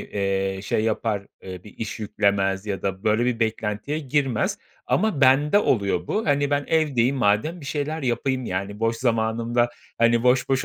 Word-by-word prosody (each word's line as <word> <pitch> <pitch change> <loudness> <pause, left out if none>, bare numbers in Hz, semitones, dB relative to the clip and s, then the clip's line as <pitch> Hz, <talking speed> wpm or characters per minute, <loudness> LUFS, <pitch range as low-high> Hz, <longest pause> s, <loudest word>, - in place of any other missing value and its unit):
eee, 95 -1 -2
şey 110 +2 0
yapar, 110 -2 -1 0.2
eee, 90 0 -9
bir 105 - -13
iş 110 0 -5
yüklemez 100 -1 0
ya 100 -2 -3
da 95 +1 -3
böyle 110 +2 +2
bir 120 -2 -1
beklentiye 110 +6 -2
girmez 135 -4 0 0.3
ama 215 -10 +1
bende 145 +8 +5
oluyor 100 - +1
bu. 220 - -1
Hani, 145 0 +1
ben 145 0 +1
evdeyim 140 -5 +2
madem 125 +10 +1
bir 140 - -10
şeyler 150 +2 -3
yapayım, 130 +1 -1
yani, 100 +3 -4
boş 115 0 +1
zamanımda, 115 0 +1 0.3
hani, 115 0 +3
boş 125 +1 +3
boş 135 -1 +1
115 Hz, 170 wpm, -23 LUFS, 105-135 Hz, 0.3 s, bende